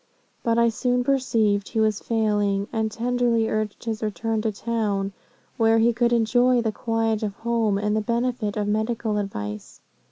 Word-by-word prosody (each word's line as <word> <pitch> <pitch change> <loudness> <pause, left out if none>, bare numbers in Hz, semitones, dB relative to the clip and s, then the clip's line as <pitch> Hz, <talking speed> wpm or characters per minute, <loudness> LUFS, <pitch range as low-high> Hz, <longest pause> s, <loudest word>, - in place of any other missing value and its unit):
But 230 -1 +1
I 235 0 +4
soon 245 +2 0
perceived 225 -6 +1
he 225 - -2
was 215 -2 +2
failing, 205 -3 0
and 220 -1 0
tenderly 235 0 +1
urged 215 -2 -2
his 225 -2 -3
return 220 +1 -2
to 220 0 0
town, 205 -2 -2 0.4
where 225 -1 +4
he 230 +1 +4
could 240 +1 +1
enjoy 245 +2 +3
the 225 -2 0
quiet 225 0 -1
of 205 -2 -3
home, 225 -3 0
and 210 +1 0
the 215 - +1
benefit 235 -1 -1
of 205 -1 -1
medical 220 0 -1
advice. 105 - -6
225 Hz, 165 wpm, -24 LUFS, 210-235 Hz, 0.4 s, I